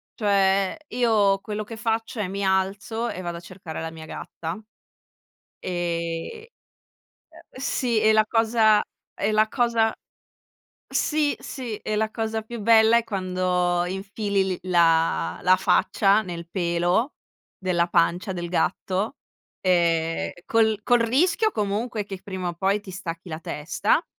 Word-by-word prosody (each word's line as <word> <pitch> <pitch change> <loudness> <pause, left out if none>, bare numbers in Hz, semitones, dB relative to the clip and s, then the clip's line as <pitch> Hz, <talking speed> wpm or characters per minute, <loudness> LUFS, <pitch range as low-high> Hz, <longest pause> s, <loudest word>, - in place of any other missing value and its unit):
cioè 195 -2 +2
io 215 -5 +3
quello 210 +1 -4
che 225 +2 -9
faccio 225 0 -2
è: 205 - -1
mi 200 +2 -4
alzo 200 +5 0
e 185 - -5
vado 170 -1 -4
a - - -9
cercare 180 -3 -8
la 165 0 -4
mia 160 -1 -10
gatta. 165 +4 -6 1.0
E 175 - -4 0.8
uhm, - - -17 0.2
sì, 245 -4 0
e 215 0 +5
la 215 0 +5
cosa 220 -1 +4 0.4
e 205 +2 +2
la 215 0 +3
cosa 230 -2 +1 0.9
Sì, 300 -2 +1
sì, 245 -6 -6
e 215 - -3
la 220 0 0
cosa 220 -1 -2
più 235 +1 -7
bella 225 +1 +6
è 235 - +1
quando 180 -3 0
infili 195 +1 -1
li 185 -2 -2
la 165 - +2
la 185 - +6
faccia 200 +2 +3
nel 170 -3 -7
pelo 175 - 0 0.4
della 175 -2 +1
pancia 175 +3 +1
del 175 -1 -4
gatto, 190 +6 -1 0.5
ehm, 165 -3 +1
col 220 -2 +2
col 245 +1 +4
rischio 340 - +2
comunque 210 - -2
che 195 -2 -7
prima 185 -2 -4
o - - -4
poi 195 +3 +1
ti 195 - -10
stacchi 175 -1 -6
la 160 -1 -5
testa, 180 - 0
195 Hz, 140 wpm, -24 LUFS, 175-220 Hz, 1.0 s, bella